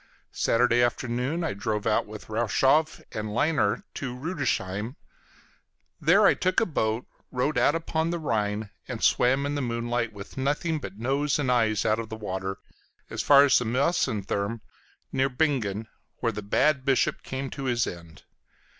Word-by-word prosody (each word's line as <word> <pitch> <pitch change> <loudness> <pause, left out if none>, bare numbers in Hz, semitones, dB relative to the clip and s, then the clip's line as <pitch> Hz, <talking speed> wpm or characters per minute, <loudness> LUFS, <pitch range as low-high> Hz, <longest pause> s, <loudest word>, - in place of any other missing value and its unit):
Saturday 120 +1 +3
afternoon 125 +6 0
I 160 - -1
drove 105 +1 -2
out 105 - +1
with 105 0 -10
Rochow 125 +7 +3 0.2
and 110 0 -4
Lynar 120 -2 +1
to 125 -3 -5
Rüdesheim; 125 - -2 1.0
there 175 +7 +5
I - - +7
took 185 0 +1
a 225 - +2
boat, 115 - -1 0.3
rowed 135 +4 0
out 150 - +3
upon 165 0 -1
the 170 - -1
Rhine, 105 -8 -1 0.2
and - - -5
swam 135 +3 +3
in 145 - -1
the 145 - -1
moonlight, 120 -1 -1
with 100 +3 -11
nothing 150 +4 0
but 95 -7 -8
nose 135 +5 0
and 135 -4 0
eyes 110 -4 +2
out 110 +1 +2
of 115 -1 -5
the 110 - -5
water, 95 -2 -4 0.5
as - - -2
far 140 -1 +7
as 140 -4 +5
the 125 - -3
Mäusethürm 115 - 0 0.5
near 135 0 +1
Bingen, 125 -7 0 0.3
where 115 - 0
the 105 -1 -5
bad 135 +7 +2
bishop 135 -2 +1
came 135 0 -5
to 135 - -5
his 120 -2 +1
end. 85 -3 -9
125 Hz, 165 wpm, -26 LUFS, 110-145 Hz, 1.0 s, I